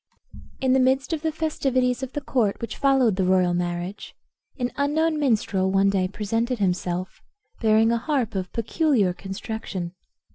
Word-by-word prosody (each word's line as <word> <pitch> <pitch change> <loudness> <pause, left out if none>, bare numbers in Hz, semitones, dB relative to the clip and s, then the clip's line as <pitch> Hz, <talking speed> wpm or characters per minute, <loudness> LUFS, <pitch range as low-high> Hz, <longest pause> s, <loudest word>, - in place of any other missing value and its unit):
In 260 -2 +2
the 265 - +4
midst 265 +4 +2
of 315 - -2
the 320 0 0
festivities 265 -5 0
of 265 -1 -5
the 290 - -3
court 230 -7 0
which 230 -2 -5
followed 265 -7 +3
the 190 - +2
royal 185 -1 +3
marriage, 175 +2 -4 0.4
an 245 -2 -2
unknown 305 +2 +1
minstrel 220 -8 +1
one 195 +1 +3
day 190 -2 +1
presented 225 +5 -2
himself, 180 -2 -2 0.4
bearing 220 0 +4
a 235 - +1
harp 265 -4 -1
of 185 -2 -3
peculiar 230 - +1
construction. 190 -1 -5
225 Hz, 155 wpm, -24 LUFS, 190-265 Hz, 0.4 s, the